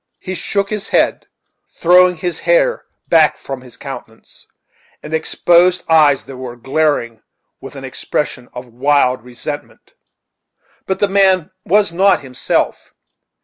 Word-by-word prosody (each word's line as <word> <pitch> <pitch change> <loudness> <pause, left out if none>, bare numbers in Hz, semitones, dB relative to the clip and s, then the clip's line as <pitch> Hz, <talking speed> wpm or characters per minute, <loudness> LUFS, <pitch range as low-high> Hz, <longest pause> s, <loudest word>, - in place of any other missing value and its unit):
He 185 - -6
shook 200 +2 -2
his 210 0 -4
head, - - +1 0.4
throwing 180 +1 +4
his 175 +2 -3
hair - - +1 0.2
back 160 -3 +4
from 135 -2 -7
his 125 -2 -14
countenance, - - -11 0.6
and 150 - -8
exposed 175 +3 +2
eyes 150 -4 +4
that 135 - -11
were 125 -2 -7
glaring 135 -3 -1 0.4
with - - -11
an - - -9
expression 125 - -4
of 125 +1 -8
wild 130 +1 +1
resentment. 120 +1 -8 0.9
But 190 - -2
the 205 - +4
man 190 -3 +2
was 200 -2 +2
not 195 +3 +3
himself. 130 -2 -2
160 Hz, 130 wpm, -16 LUFS, 130-185 Hz, 0.9 s, throwing